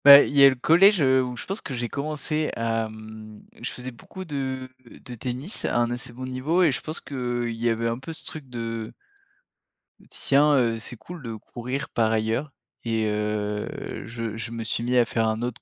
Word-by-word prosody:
Bah, 140 0 +12
il - - -4
y 140 - +8
a 140 - +11
le 130 - 0
collège, 180 +10 +6
heu, 130 -1 +5
où 125 -1 -4
je - - -6
pense 195 +3 -3
que 135 - -5
j'ai 120 0 -2
commencé 150 +2 -2
à 115 -1 0
mmh, 110 0 -11 0.2
je 120 - -2
faisais 125 +1 -6
beaucoup 185 +10 -10
de 130 -4 -3 0.2
de 125 - -11
tennis 125 - -4
à - - +1
un 120 0 +2
assez 120 0 -5
bon 130 +2 -7
niveau 135 +8 +1
et 160 - +5
je - - -2
pense 155 +2 -3
qu'il 120 -3 -2
y 120 +1 +1
avait 115 0 0
un 115 +1 -1
peu 135 +5 -7
ce 160 - -6
truc 150 -4 -7
de 115 -2 -4 1.2
«tiens, 145 +2 +4
heu, 115 -3 +2
c'est 115 - -6
cool 170 +10 -9
de 115 -3 -5
courir» 125 +6 -5
par 110 -1 +2
ailleurs 110 +6 0 0.3
et 115 -1 0
heu 105 0 -1 0.4
je 115 -1 -4
je 110 +1 -4
me 115 -1 -4
suis 110 +1 -1
mis 125 +1 +2
à 120 - +6
faire 115 0 +1
un 110 +1 -1
autre 120 -1 -3
120 Hz, 215 wpm, -25 LUFS, 115-140 Hz, 1.2 s, Bah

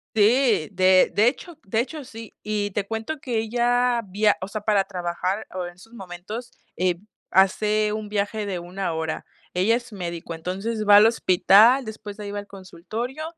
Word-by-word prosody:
Sí, 220 - +3
de 185 0 +4
de 215 +4 +5
hecho 320 +4 -6
de 220 +3 0
hecho, 300 +4 -5
sí. 225 -3 -11
Y 210 -1 -2
te 200 0 -3
cuento 225 +8 -4
que 240 -4 -2
ella, 240 +2 +1
viaj 205 +2 +2
o 185 - -5
sea, 210 +1 -5
para 205 -2 +2
trabajar, 185 +1 -3 0.2
en 175 - -12
esos 195 +6 -18
momentos, 205 +4 -8 0.8
hace 210 +3 +2
un 215 -1 -4
viaje 210 +1 -2
de 190 -3 -3
1 180 0 -4
hora. 160 0 -4 0.3
Ella 205 +6 +3
es 245 -1 -8
médico, 170 -3 -6
entonces 195 +6 -4
va 205 - +9
al 210 +1 +8
hospital, 225 +4 +5
después 215 -2 -8
de 210 - -8
ahí 200 - -5
va 205 - -4
al 205 - -7
consultorio, 215 - -6
210 Hz, 175 wpm, -24 LUFS, 190-230 Hz, 0.8 s, va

